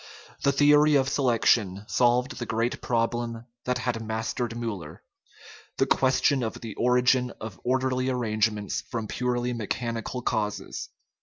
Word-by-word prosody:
The 140 - +3
theory 150 +1 +5
of 135 -1 +3
selection 115 -7 +2
solved 125 +1 +2
the 120 - -4
great 115 +2 -1
problem 115 0 -1 0.2
that 125 0 0
had 120 -2 -2
mastered 110 +1 -3
Miiller 105 -10 -5 0.8
the - - +3
question 130 +1 +2
of 110 -2 -2
the 115 -3 -7
origin 125 +1 +3
of 110 -5 -8
orderly 130 0 +1
arrange 110 -3 +1
ments 105 -2 -4
from 115 -2 -5
purely 125 +1 -1
mechanical 115 +2 -3
causes. 105 -4 -2
120 Hz, 135 wpm, -26 LUFS, 110-130 Hz, 0.8 s, theory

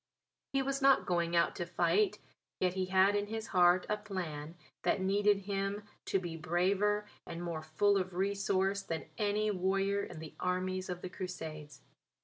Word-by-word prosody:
He 275 0 +1
was 275 +1 -1
not 275 -1 +5
going 170 -1 0
out 170 - +3
to 175 - -2
fight, 190 +5 +2 0.4
yet 180 -1 +2
he 190 0 -1
had 190 +2 +4
in 205 0 0
his 220 +1 -4
heart 180 -1 +5
a 210 - 0
plan 175 -7 -5 0.3
that - - +1
needed 200 +1 +3
him 200 +1 -2 0.2
to - - +1
be 175 -3 -4
braver 190 +6 +1 0.2
and 170 +1 -5
more 170 -2 -3
full 195 +6 +2
of 185 -1 -2
resource 195 0 +1
than 165 -4 -4
any 210 0 +1
warrior 195 +1 +1
in 175 - -8
the 155 -1 -8
armies 185 +1 -1
of 180 0 -5
the 185 - -4
Crusades. 155 -6 -7
190 Hz, 170 wpm, -33 LUFS, 175-205 Hz, 0.4 s, not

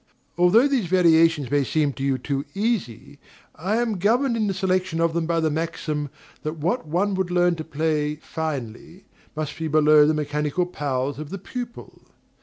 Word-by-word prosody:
Although 180 +10 +5
these 260 -9 0
variations 165 -6 +4
may 145 -1 +3
seem 145 +1 0
to 135 - -9
you 135 -1 +1
too 135 +2 -3
easy, 180 - -2 0.3
I 190 +7 -2
am 225 -4 0
governed 235 +6 +2
in 220 -2 0
the 195 - 0
selection 185 -2 0
of 165 -1 +2
them 165 -1 -1
by 165 -1 +1
the 160 -1 +1
maxim 155 -2 -3 0.3
that 155 +2 -4
"what 170 +5 -1
one 190 +6 0
would 190 -1 -1
learn 175 0 +3
to 160 - -4
play 150 -1 -1
finely 155 - -6 0.3
must 150 -1 -4
be 160 - -2
below 150 -1 +5
the 155 - +2
mechanical 150 +3 -1
powers 140 -4 -3
of 155 -1 -7
the 195 - -5
pupil." 240 +4 -8
160 Hz, 180 wpm, -23 LUFS, 150-185 Hz, 0.3 s, Although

